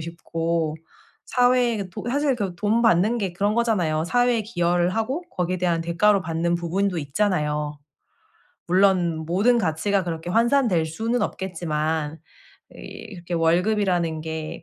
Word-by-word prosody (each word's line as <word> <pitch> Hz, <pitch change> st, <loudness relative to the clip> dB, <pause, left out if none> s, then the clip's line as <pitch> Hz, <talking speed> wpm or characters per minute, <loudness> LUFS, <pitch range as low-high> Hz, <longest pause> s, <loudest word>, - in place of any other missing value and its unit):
싶고 165 Hz, -1 st, -2 dB, 0.5 s
사회에도 245 Hz, -6 st, +1 dB
사실 280 Hz, 0 st, +1 dB
그 195 Hz, -6 st, -3 dB
돈 215 Hz, +5 st, +1 dB
받는 220 Hz, +1 st, +3 dB
게 195 Hz, -5 st, -2 dB
그런 205 Hz, +4 st, 0 dB
거잖아요. 180 Hz, -10 st, +1 dB
사회에 245 Hz, +4 st, +2 dB
기여를 175 Hz, -4 st, 0 dB
하고 225 Hz, -, -2 dB
거기에 180 Hz, 0 st, -2 dB
대한 175 Hz, -2 st, +1 dB
대가로 195 Hz, +5 st, +2 dB
받는 165 Hz, +1 st, -1 dB
부분도 175 Hz, +2 st, -1 dB
있잖아요. 150 Hz, -2 st, -1 dB, 0.9 s
물론 180 Hz, -3 st, +2 dB
모든 205 Hz, +9 st, +3 dB
가치가 195 Hz, +1 st, 0 dB
그렇게 170 Hz, 0 st, -4 dB
환산될 230 Hz, -6 st, +2 dB
수는 225 Hz, +9 st, -2 dB
없겠지만 160 Hz, -4 st, -2 dB, 0.5 s
이렇게 185 Hz, -6 st, -8 dB
월급이라는 175 Hz, -1 st, +1 dB
게 160 Hz, 0 st, -6 dB
180 Hz, 295 characters per minute, -23 LUFS, 165-215 Hz, 0.9 s, 받는